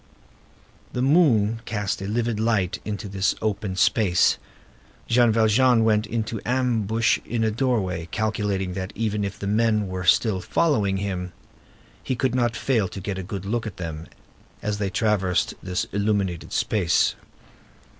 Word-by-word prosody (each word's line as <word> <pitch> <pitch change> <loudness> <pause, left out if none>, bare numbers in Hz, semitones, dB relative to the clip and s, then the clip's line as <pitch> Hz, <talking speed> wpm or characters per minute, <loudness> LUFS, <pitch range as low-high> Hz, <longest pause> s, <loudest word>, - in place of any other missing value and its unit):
The 125 - -1
moon 120 -8 +3
cast 105 -3 -2
a 95 - -4
livid 115 0 -1
light 110 -5 0
into 105 -1 -4
this 95 0 0
open 105 -3 -2
space. 95 -2 +3 0.7
Jean 120 -1 +4
Valjean 115 +2 +4
went 105 -1 +2
into 110 0 -3
ambush 115 -3 +1
in 115 -1 -2
a 110 - +2
doorway, 105 -9 -1
calculating 105 -3 -1
that 95 0 -4
if 105 -3 -2
the - - -6
men 105 0 +2
were 95 -1 -4
still 95 +2 +3
following 105 - +1
him, 90 -2 -4 0.7
he 130 - -1
could 130 0 0
not 120 -2 +1
fail 115 -6 +1
to 100 - -8
get 95 0 -4
a - - -2
good 100 0 -6
look 110 +2 -2
at 105 - -8
them, 80 -2 -6 0.6
as 105 -1 -2
they 100 -2 -1
traversed 95 -2 +1
this 90 -1 -2
illuminated 100 -4 -1
space. 90 -6 +2
105 Hz, 145 wpm, -24 LUFS, 95-115 Hz, 0.7 s, Jean